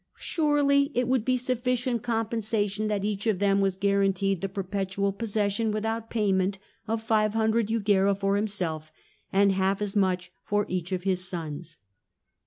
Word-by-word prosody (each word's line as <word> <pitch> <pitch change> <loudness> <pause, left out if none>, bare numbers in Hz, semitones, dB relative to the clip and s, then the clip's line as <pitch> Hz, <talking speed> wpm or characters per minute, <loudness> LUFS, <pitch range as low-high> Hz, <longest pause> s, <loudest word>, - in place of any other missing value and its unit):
Surely 290 -3 +2
it 245 0 +1
would 255 -3 +2
be 255 +1 +2
sufficient 250 -1 0
compensation 220 -2 -1
that 205 -2 -1
each 210 +1 -2
of 215 -4 +2
them 200 0 +2
was 195 -1 +1
guaranteed 195 -1 +1
the 195 - -2
perpetual 195 +1 -2
possession 210 0 -1
without 225 +1 -2
payment 195 -3 +1 0.3
of 220 0 -2
500 220 0 +2
jugera 200 -3 +2
for 195 0 0
himself 180 -7 -2 0.4
and 200 +1 +4
half 190 +1 +1
as 205 -1 -2
much 185 -2 +1
for 205 0 0
each 180 0 -3
of 180 -1 -2
his 185 -2 0
sons." 165 -2 -6
205 Hz, 150 wpm, -27 LUFS, 195-225 Hz, 0.4 s, and